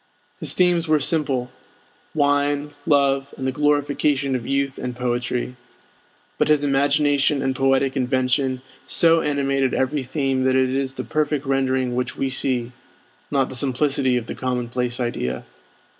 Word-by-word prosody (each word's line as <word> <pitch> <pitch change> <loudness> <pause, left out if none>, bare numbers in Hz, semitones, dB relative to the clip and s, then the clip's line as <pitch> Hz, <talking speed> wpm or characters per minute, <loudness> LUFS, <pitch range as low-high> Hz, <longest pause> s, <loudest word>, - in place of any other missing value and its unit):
His - - -1
themes 175 -2 +2
were 155 -1 +3
simple, 135 -5 0 0.6
wine, 145 0 +1 0.2
love, 140 -2 +2
and 130 - -4
the 130 - +1
glorification 145 -1 +1
of 120 -2 -4
youth 140 -1 -1
and 125 -1 -4
poetry; 125 0 -2 0.8
but - - +3
his 150 -1 +3
imagination 145 0 +2
and 135 -1 0
poetic 135 0 +2
invention 130 0 0 0.2
so 165 -1 +4
animated 135 -3 0
every 135 +2 0
theme 135 0 -1
that 130 0 +3
it 130 -1 +2
is 135 0 -1
the - - -4
perfect 150 -2 -1
rendering 130 -2 0
which 125 +1 -2
we 135 -1 -1
see, 125 -2 +1 0.6
not 135 -2 +1
the - - -6
simplicity 130 0 +1
of 120 - -3
the - - -5
commonplace 125 -1 -2
idea. 120 - -3
135 Hz, 145 wpm, -22 LUFS, 130-145 Hz, 0.8 s, so